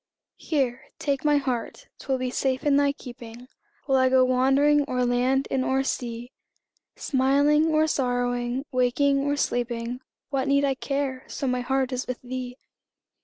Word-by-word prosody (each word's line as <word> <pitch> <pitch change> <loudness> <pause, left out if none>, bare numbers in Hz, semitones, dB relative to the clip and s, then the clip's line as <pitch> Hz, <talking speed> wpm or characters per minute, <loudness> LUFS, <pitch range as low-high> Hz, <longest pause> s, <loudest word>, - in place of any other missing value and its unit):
Here, 265 -5 -1
take 280 -2 -2
my 295 -1 +4
heart 255 -4 -3
'twill 265 -2 -1
be 255 -1 -3
safe 260 0 -1
in 290 -1 +4
thy 285 0 +3
keeping, 245 -3 -11 0.4
While 270 -2 +2
I 260 0 +4
go 260 0 +5
wandering 270 +3 +3
o'er 250 -1 0
land 250 +2 +1
and 265 -1 +1
o'er 265 +1 +1
sea; 240 -2 -4 0.6
Smiling 285 +3 +2
or 310 -1 +3
sorrowing, 245 -2 -1
waking 270 +2 +2
or 285 +1 0
sleeping, 240 -2 -2 0.3
What 270 -1 -1
need 280 0 +3
I 275 - +1
care, 270 -1 -3
so - - -5
my 250 -1 0
heart 265 +1 0
is 255 0 -3
with 255 - -4
thee? 250 0 -6
260 Hz, 160 wpm, -25 LUFS, 250-280 Hz, 0.6 s, go